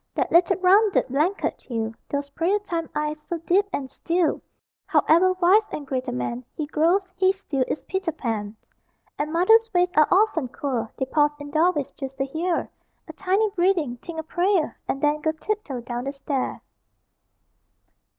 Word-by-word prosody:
That - - 0
little 340 0 +4
rounded 390 -2 +4
blanket 310 +9 0
hill; 225 -2 -3 0.2
Those 280 0 -3
prayer 345 +7 +1
time 340 -6 -4
eyes, 300 0 -2
so 345 - -4
deep 360 +5 +2
and 280 -6 -3
still 335 +4 -1 0.5
However 370 +4 +4
wise 380 +4 +3
and 295 - -5
great 260 -2 -3
a - - -1
man 125 0 -3
He 305 - -2
grows, 335 +6 +2
he 375 0 +4
still 315 -9 -2
is - - -3
Peter 380 -3 -2
Pan. 225 -8 -4 0.6
And 300 +1 -1
mothers' 445 +7 +4
ways 355 0 +3
are 305 -1 +6
often 370 -8 +3
queer: 245 -3 -3
They 265 - -1
pause 295 +2 +2
in 290 0 -8
doorways, 310 -2 +1
just 270 -1 -6
to 270 - 0
hear 330 +5 -2 0.4
A 320 - -9
tiny 390 +5 +1
breathing; 350 - +1
think 325 +6 -8
a - - -3
prayer; 350 +1 0
And 275 - -3
then 295 +1 +2
go 315 0 0
tiptoe 315 - -4
down 240 +1 -5
the 275 - -2
stair. 275 -1 -3
315 Hz, 170 wpm, -24 LUFS, 275-370 Hz, 0.6 s, are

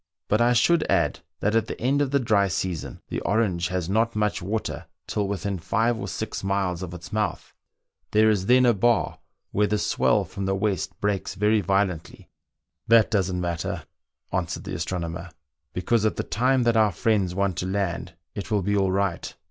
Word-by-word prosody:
" - - -66
But 105 +2 +3
I 120 +1 +4
should 160 +7 +4
add 85 -7 +2 0.2
that 105 - +1
at 115 - +2
the - - -6
end 135 +4 +2
of 140 - +1
the 140 +1 +2
dry 105 -5 +3
season 90 -3 -3
the - - -2
Orange 95 -6 +1
has 90 -2 -2
not 115 +4 +1
much 105 -2 0
water 105 +5 -3 0.2
till 105 -2 -1
within 100 -1 -3
five 115 +8 +1
or - - -5
six 110 -2 -4
miles 95 -3 0
of 90 -1 -6
its 90 +4 -10
mouth; 105 -5 -2 0.6
there 110 +1 +4
is 100 -3 +2
then 125 +1 +6
a 120 - +5
bar, 115 +3 +1 0.3
where 105 +1 +2
the 105 - +1
swell - - +2
from 100 0 -5
the 95 - +1
west 100 -1 -2
breaks 100 -1 -1
very 105 +2 +3
violently." 95 -3 -1 0.3
" - - -57
That 115 -1 +5
doesn't 95 -4 +1
matter," 85 -1 -3 0.5
answered - - -2
the - - -6
astronomer, 85 0 -4 0.2
" - - -55
be 90 - -3
cause 115 +3 +2
at 110 - +1
the - - -2
time 125 +7 +2
that 120 -1 +2
our 110 -2 +4
friends 95 0 +1
want 100 -2 0
to 90 - -2
land 90 -3 -2 0.2
it 100 - -6
will 105 -3 +1
be 100 +2 +1
all 95 -2 +2
right. 95 -2 -1
100 Hz, 205 wpm, -25 LUFS, 90-110 Hz, 0.6 s, then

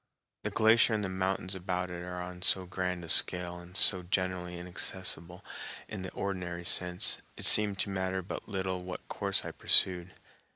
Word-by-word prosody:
The - - -5
glacier 110 +1 +2
and 105 - -4
the 95 - -4
mountains 95 0 -4
about 90 0 -5
it 85 -1 -8
are 90 0 -8
on 90 0 -9
so 95 0 +2
grand 90 -1 -5
a - - -13
scale 90 +1 +4
and 90 +2 -9
so 90 -3 +9
generally 90 -1 -4
inaccessible 90 0 -3 0.4
in 105 -3 -8
the 95 - -7
ordinary 90 -3 -6
sense, 90 0 +3 0.2
it - - -3
seemed 105 -2 +5
to - - -4
matter 95 0 -4
but 95 - -9
little 95 -2 -5
what 90 0 -10
course - - -2
I - - -7
pursued. 90 0 +1
90 Hz, 175 wpm, -28 LUFS, 90-95 Hz, 0.4 s, so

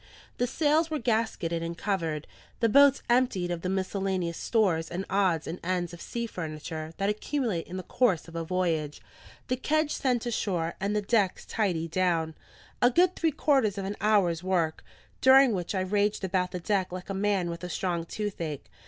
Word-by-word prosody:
The 245 - +2
sails 310 +4 +2
were 310 - -1
gasketted 220 - -1
and 170 0 -4
covered, 165 -6 -2 0.3
the 230 - +3
boats 280 +4 +5
emptied 240 -8 +2
of 170 -1 -3
the 185 - -2
miscellaneous 190 -2 -1
stores 180 -8 +1
and 185 +3 -4
odds 185 -5 +2
and 175 - -5
ends 175 -1 -1
of 175 - -10
sea 235 0 -4
furniture, 160 -4 -6
that 195 - 0
accumulate 215 - -1
in 185 - -6
the 185 - -5
course 205 -10 +1
of 165 - -12
a 165 - -2
voyage, 165 -4 -1 0.5
the 255 - +1
kedge 310 +3 +1
sent 250 -3 0
ashore, 180 -8 -1
and 200 +2 -1
the 210 - 0
decks 200 -3 +1
tidied 170 -7 -1
down: 165 -3 +1 0.5
a 245 - +6
good 355 +7 +3
three 330 - +1
quarters 265 -8 +2
of 195 - -3
an 200 +2 -3
hour's 195 -6 +3
work, 175 -4 0 0.4
during 265 0 +7
which 185 0 -2
I 190 - +1
raged 205 +2 0
about 185 -1 0
the 180 - -5
deck 190 0 0
like 185 +2 -6
a - - -2
man 195 -3 0
with 170 +1 -7
a 180 - -4
strong 175 -2 -1
toothache. 170 -9 -4
190 Hz, 190 wpm, -28 LUFS, 170-225 Hz, 0.5 s, during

